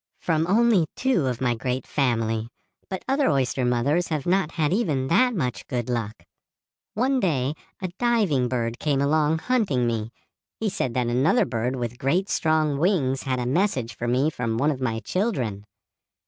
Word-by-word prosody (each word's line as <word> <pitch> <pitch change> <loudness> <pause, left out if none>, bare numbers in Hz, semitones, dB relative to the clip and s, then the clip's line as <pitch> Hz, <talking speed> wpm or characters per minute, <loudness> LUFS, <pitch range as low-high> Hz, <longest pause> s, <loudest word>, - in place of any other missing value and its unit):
"From 165 -1 0
only 210 -4 +4
two 250 - +1
of 125 -1 -3
my 125 -2 +2
great 125 +2 -3
family, 115 -5 0 0.4
but 190 -1 -5
other 275 +1 +2
oyster 135 -2 0
mothers 125 +8 +1
have 150 -4 -2
not 180 -2 +1
had 155 -1 +1
even 150 - 0
that 245 +7 +3
much 125 - -3
good 125 -2 -2
luck. 110 -6 -3 0.7
One 260 +5 +2
day 145 - 0 0.3
a 185 - -1
diving 210 - +2
bird 120 -1 -2
came 145 -3 0
along 150 +2 +2
hunting 195 - +1
me. 115 -1 -2 0.5
He 220 - 0
said 130 -9 -2
that 125 -1 +1
another 130 - +3
bird 120 +2 -2
with 120 -1 -4
great 180 +9 +1
strong 155 -3 +1
wings 145 -7 +1
had 130 -1 -1
a 125 - -2
message 130 - 0
for 120 - -4
me 130 +6 +2
from 115 -5 -2
one 145 +5 +2
of 135 -3 -5
my 115 -3 -1
children. 125 - -2
135 Hz, 175 wpm, -24 LUFS, 120-180 Hz, 0.7 s, only